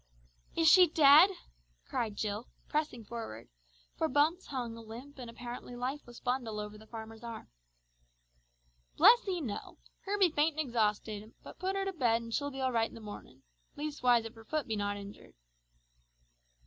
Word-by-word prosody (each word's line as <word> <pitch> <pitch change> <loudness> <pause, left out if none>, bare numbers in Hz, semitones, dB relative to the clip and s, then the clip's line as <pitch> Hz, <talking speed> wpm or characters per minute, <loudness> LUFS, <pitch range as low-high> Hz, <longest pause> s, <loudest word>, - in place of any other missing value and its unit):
"Is 330 -1 +3
she 360 +2 +9
dead?" 305 +3 +8 0.6
cried 220 -3 -2
Jill, 210 +2 -3 0.2
pressing 295 -6 -2
forward, 205 - -7 0.5
for 320 - 0
Bumps 315 +6 +2
hung 245 -4 -4
a 230 - -9
limp 245 +6 -10
and 245 -2 -7
apparently 240 +1 -8
lifeless 250 0 -5
bundle 245 -4 -2
over 210 0 -6
the 215 +1 -14
farmer's 225 0 -9
arm. 230 - -7 1.5
"Bless 480 -3 +7
'ee, 365 -3 -1
no! 225 -8 -5 0.3
Her 405 +1 -1
be 375 -4 +4
faint 305 0 +1
an' 310 - 0
exhausted, 215 -2 -1
but - - -12
put 380 +2 -1
her 390 0 -1
to 390 - -2
bed 235 -7 +2
an' 230 - -8
she'll 285 +4 -1
be 270 -1 -6
all 260 -1 +1
right 225 -2 +1
in - - -14
the - - -9
mornin'. 205 - -10 0.3
Leastwise 255 -6 +2
if 225 - -7
her 225 - -14
foot 305 +5 -1
be 220 - -2
not 205 0 -1
injured!" 200 0 -11
245 Hz, 175 wpm, -32 LUFS, 220-300 Hz, 1.5 s, she